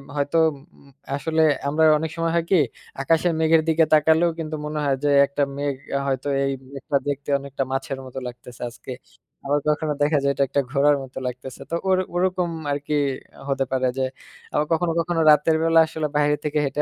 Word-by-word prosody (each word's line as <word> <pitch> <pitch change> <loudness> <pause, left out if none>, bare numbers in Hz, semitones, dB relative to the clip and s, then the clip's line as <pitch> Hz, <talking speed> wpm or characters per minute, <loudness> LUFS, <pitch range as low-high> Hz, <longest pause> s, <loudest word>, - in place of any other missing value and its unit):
হয়তো 145 +3 0
উম 145 - -11 0.2
উম 140 - -20 0.3
আসলে 160 +3 0 0.3
আমরা 155 +3 +1
অনেক 160 +1 -3
সময় 165 0 0
হয় 170 - +1
কি, 190 - +6 0.4
আকাশের 165 +4 +2
মেঘের 160 0 +4
দিকে 160 0 +4
তাকালেও 160 +2 +4
কিন্তু 155 -1 -4
মনে 150 0 -3
হয় 140 - +2
যে 145 - +2 0.2
একটা 140 +1 -4 0.2
মেঘ 145 -1 -1 0.3
হয়তো 135 0 -2 0.2
এই 135 - 0 0.2
মেঘটা 140 +1 -1
দেখতে 145 0 -3
অনেকটা 140 0 -4
মাছের 135 0 -3
মতো 130 0 -7
লাগতেছে 120 0 -11
আজকে। 120 +2 -9 0.5
আবার 145 +1 +1
কখনো 150 0 +1
দেখা 145 +1 +3
যায় 140 - +3
এটা 140 - +1
একটা 140 - +1
ঘোড়ার 145 +1 +4
মতো 130 - -12
লাগতেছে 125 +1 -7
তো 165 - -1
ওই 190 - +5 0.2
ওরকম 180 -1 +1 0.2
আরকি 145 +1 -3 0.6
হতে 135 -1 +1
পারে। 130 -1 0
যে - - 0 0.5
আবার 150 - +1
কখনো, 165 +1 +1
কখনো 170 0 0
রাতের 150 +2 +4
বেলা 165 0 +5
আসলে 160 -1 -3
বাইরে 150 0 +3
থেকে 150 0 -1
হেঁটে 145 +2 -1
150 Hz, 190 wpm, -23 LUFS, 140-160 Hz, 0.6 s, কি